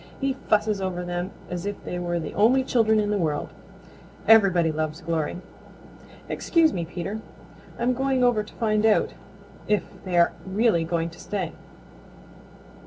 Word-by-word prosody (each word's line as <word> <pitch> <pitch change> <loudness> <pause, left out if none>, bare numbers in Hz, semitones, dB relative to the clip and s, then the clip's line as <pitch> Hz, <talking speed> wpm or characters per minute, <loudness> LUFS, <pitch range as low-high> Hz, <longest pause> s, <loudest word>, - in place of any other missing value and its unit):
He 275 -1 0 0.2
fusses 210 -1 +2
over 180 -2 -3
them 175 +1 -3 0.2
as 180 +2 -4
if 205 - -5
they 180 - -4
were 175 -1 -1
the 160 - -5
only 255 +6 +4
children 220 -4 +3
in 210 0 0
the 205 - +1
world. 150 -4 -1 0.8
Everybody 190 -7 +5
loves 155 +1 -3
Glory. 165 -2 -2 0.9
Excuse 330 -3 +2
me, 170 -2 -2
Peter, 185 +6 -5 0.6
I'm 245 +2 +1
going 265 0 +1
over 245 -3 +3
to 210 - -11
find 215 -2 +1
out 220 -1 +3 0.5
if 210 -1 +2 0.2
they 180 -2 -1
are 170 - +5
really 190 -3 +2
going 165 0 -1
to 165 - -15
stay." 185 -3 -3
195 Hz, 155 wpm, -25 LUFS, 175-220 Hz, 0.9 s, Everybody